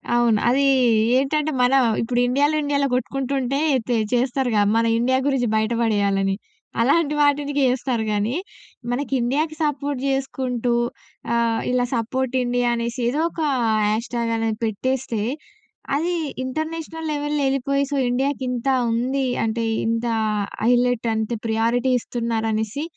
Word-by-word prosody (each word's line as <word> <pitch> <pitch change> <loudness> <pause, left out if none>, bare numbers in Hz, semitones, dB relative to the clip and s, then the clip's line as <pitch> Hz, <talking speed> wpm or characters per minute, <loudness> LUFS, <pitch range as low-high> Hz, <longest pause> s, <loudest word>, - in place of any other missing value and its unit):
అవును. 235 -3 +3
అది 275 +3 +3 0.5
ఏంటంటే 300 +3 0
మనం 265 +2 +4 0.2
ఇప్పుడు 240 +1 0
ఇండియాలో 285 +4 +2
ఇండియాలో 285 -1 +1
కొట్టుకుంటుంటే 270 +1 -1 0.3
తే 245 - +1 0.2
చేస్తారుగా 245 -3 +1
మన 230 0 +3
ఇండియా 260 +2 +2
గురించి 265 -4 +1
బయట 220 +1 +1
పడేయాలని. 200 -3 +1 0.5
అలాంటి 295 +5 +2
వాటిటికి 285 0 +2
ఏస్తారు 250 -2 -1
కానీ, 210 +3 0 0.6
మనకి 275 +3 -2
ఇండియాకి 300 +6 0
సపోర్ట్ 285 -2 -1
చేసుకుంటూ 260 -3 -1 0.6
ఆహ్, 230 -1 +1
ఇలా 250 0 +2
"సపోర్ట్ 255 +3 -2
ఇండియా" 245 0 0
అనేసి 235 +1 -3
ఏదో 275 +6 0
ఒక 335 - -6 0.4
హ్యాష్ 220 +2 -1
ట్యాగ్ 235 -1 -1
అనేది 225 -1 -1
పెట్టేస్తే 240 +1 -2 0.7
అది 335 +5 0 0.3
ఇంటర్నేషనల్ 320 +4 -4
లెవెల్‌లో 295 0 -1
ఎళ్ళిపోయి, 275 +1 0
సో - - 0
ఇండియాకింత 255 -1 -1 0.2
ఉంది 260 +4 0 0.2
అంటే 225 +1 -1 0.2
ఇంత 230 +1 0 0.6
హైలైట్ 245 0 +2
అంటే 220 +1 -1
ప్రియారిటీ 230 +3 +1
ఇస్తున్నారనేసి 225 +1 -2
250 Hz, 125 wpm, -22 LUFS, 230-275 Hz, 0.7 s, మనం